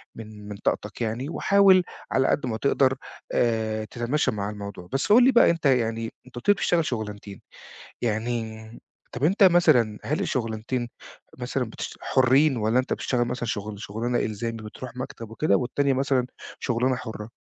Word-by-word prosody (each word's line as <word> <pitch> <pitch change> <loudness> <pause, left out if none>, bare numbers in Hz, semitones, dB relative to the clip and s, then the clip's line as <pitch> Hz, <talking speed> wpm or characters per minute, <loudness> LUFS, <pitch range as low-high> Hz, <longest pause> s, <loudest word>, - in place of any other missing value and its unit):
من 105 -2 -10
من 105 - -6
طاقتك، - - -2
يعني 120 +6 -2
وحاول 195 0 +5 0.3
على 130 0 +2
قد 145 - +1
ما 110 -2 -2
تقدر 135 0 +2 0.4
آآ، 110 -2 0
تتماشى 125 +4 -1
مع 100 -1 -3
الموضوع، 100 -4 -8
بس 135 - 0
قُل 245 +2 +8
لي 265 - +6
بقى 240 - +6
أنت 165 -2 -1
يعني 115 -3 +1
أنت 130 - -16
قُلت 120 - -8
لي 205 - +9
بتشتغل 170 -5 +1
شُغلانتين، 105 -4 -5 0.6
يعني 110 -1 -3 0.4
طَب 125 - -5
أنت 195 +6 +4
مثلًا 125 - +4
هل 150 +5 -1
الشُغلانتين 120 - -2 0.5
مثلًا - - -2
بتش - - -7
حرّين، 130 +2 +3
والّا 110 +3 +2
أنت 130 - -1
بتشتغل 120 -2 0
مثلًا 120 0 -3
شغل 105 -1 -4
شُغلانة 115 +4 -2
إلزامي، 115 +2 -3
بتروح 120 +3 -9
مكتب 115 -4 -7
وكده، 155 +7 +2
والتانية 140 +2 0
مثلًا 130 -2 +1 0.3
شُغلانة 125 +1 0
حُرّة؟ 110 -2 -7
120 Hz, 160 wpm, -25 LUFS, 110-135 Hz, 0.6 s, لي